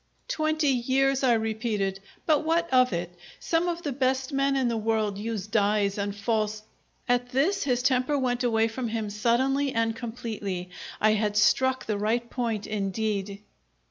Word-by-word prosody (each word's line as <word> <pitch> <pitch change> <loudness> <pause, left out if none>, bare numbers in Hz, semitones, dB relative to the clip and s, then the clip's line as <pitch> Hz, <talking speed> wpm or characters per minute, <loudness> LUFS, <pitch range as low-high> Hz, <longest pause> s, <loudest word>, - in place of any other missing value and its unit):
"Twenty 310 - +1
years," 270 +2 +2
I 250 -2 +5
repeated. 220 -3 -1 0.3
"But 310 -1 +3
what 330 +2 +1
of 255 -1 +5
it? 175 0 -3 0.3
Some 335 +1 0
of 345 0 -3
the 290 - -2
best 260 +1 0
men 275 0 +2
in 265 -2 +1
the 235 - 0
world 215 -2 0
use 215 -2 -3
dyes 205 -1 +1
and 200 0 -2
false 215 0 -1 0.2
" - - -41
At 245 0 +1
this 335 +11 +1
his 250 -2 +1
temper 260 +2 +2
went 250 -2 0
away 225 -2 +2
from 235 +2 -4
him 220 -2 -3
suddenly 260 +6 +1
and 225 0 +1
completely. 220 -6 -5 0.3
I 215 - +4
had 210 -1 0
struck 260 +4 +3
the 210 -2 -2
right 230 +3 0
point 230 -5 -2
indeed! 200 -1 -2
230 Hz, 170 wpm, -27 LUFS, 210-265 Hz, 0.3 s, I